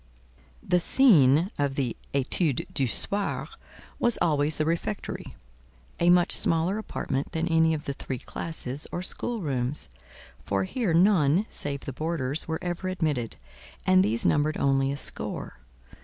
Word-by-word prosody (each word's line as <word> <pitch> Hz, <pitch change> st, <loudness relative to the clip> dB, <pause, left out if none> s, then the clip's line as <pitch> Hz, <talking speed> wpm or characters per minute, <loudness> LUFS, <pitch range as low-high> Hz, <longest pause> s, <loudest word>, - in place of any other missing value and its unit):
The 180 Hz, -, +3 dB
scene 170 Hz, -, +5 dB
of 140 Hz, -2 st, 0 dB
the 130 Hz, -5 st, -1 dB, 0.2 s
"etude 140 Hz, +1 st, +1 dB
du 135 Hz, -, +1 dB
soir" 200 Hz, -, -1 dB, 0.5 s
was 240 Hz, -1 st, +3 dB
always 150 Hz, -1 st, +1 dB
the 155 Hz, -, 0 dB
refectory, 170 Hz, +6 st, -3 dB, 0.6 s
a 170 Hz, -, +4 dB
much 175 Hz, 0 st, +4 dB
smaller 170 Hz, +5 st, +1 dB
apartment 135 Hz, -9 st, -3 dB
than 165 Hz, +1 st, -1 dB
any 160 Hz, -1 st, +3 dB
of 150 Hz, -, -7 dB
the 140 Hz, -, -2 dB
three 130 Hz, -1 st, -5 dB
classes 145 Hz, 0 st, -6 dB
or 175 Hz, -, -3 dB
schoolrooms; 150 Hz, -, -2 dB, 0.5 s
for 100 Hz, -1 st, 0 dB
here 185 Hz, -, -1 dB
none, 175 Hz, -1 st, +4 dB
save 140 Hz, -1 st, -3 dB
the 135 Hz, -, -5 dB
boarders, 155 Hz, -1 st, -2 dB
were 160 Hz, 0 st, -1 dB
ever 175 Hz, +1 st, -3 dB
admitted, 150 Hz, -10 st, -1 dB, 0.5 s
and 95 Hz, 0 st, +5 dB
these 110 Hz, +4 st, -1 dB
numbered 150 Hz, +1 st, +2 dB
only 135 Hz, 0 st, +2 dB
a 140 Hz, -, -3 dB
score. -, -, -4 dB
155 Hz, 140 wpm, -27 LUFS, 135-175 Hz, 0.6 s, scene